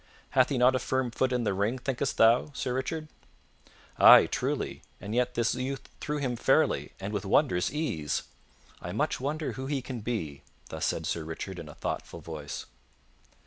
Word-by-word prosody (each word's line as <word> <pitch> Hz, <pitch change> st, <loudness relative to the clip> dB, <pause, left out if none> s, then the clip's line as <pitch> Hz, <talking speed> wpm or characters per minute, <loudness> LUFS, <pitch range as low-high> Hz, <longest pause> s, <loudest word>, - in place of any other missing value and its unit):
Hath -, -, +4 dB
he 135 Hz, -, 0 dB
not 125 Hz, +1 st, +5 dB
a 130 Hz, -, +1 dB
firm 130 Hz, -2 st, -1 dB
foot 130 Hz, +2 st, 0 dB
in 125 Hz, -1 st, 0 dB
the 105 Hz, -, +1 dB
ring, 105 Hz, +6 st, 0 dB
thinkest 135 Hz, +1 st, -2 dB
thou, 115 Hz, +6 st, +5 dB
Sir 125 Hz, -, -2 dB
Richard?" 155 Hz, +5 st, -3 dB, 0.9 s
"Ay, -, -, +10 dB
truly, -, -, -2 dB, 0.2 s
and 100 Hz, +2 st, -6 dB
yet 125 Hz, +1 st, +1 dB
this 115 Hz, -1 st, +2 dB
youth 130 Hz, +2 st, -4 dB
threw 150 Hz, -1 st, -2 dB
him 130 Hz, -4 st, -1 dB
fairly, -, -, +2 dB
and 100 Hz, +2 st, -5 dB
with 100 Hz, -, -2 dB
wondrous 95 Hz, -, +2 dB
ease. 80 Hz, -, -2 dB, 0.6 s
I -, -, -5 dB
much -, -, 0 dB
wonder 150 Hz, +4 st, -2 dB
who 130 Hz, 0 st, -6 dB
he 140 Hz, -1 st, 0 dB
can 130 Hz, -2 st, -5 dB
be." 95 Hz, -, -4 dB, 0.3 s
Thus -, -, -2 dB
said -, -, -2 dB
Sir 85 Hz, -, -2 dB
Richard 85 Hz, +3 st, -6 dB
in 80 Hz, -3 st, -8 dB
a 75 Hz, -, -11 dB
thoughtful -, -, -4 dB
voice. 75 Hz, -3 st, -6 dB
125 Hz, 185 wpm, -29 LUFS, 100-130 Hz, 0.9 s, Ay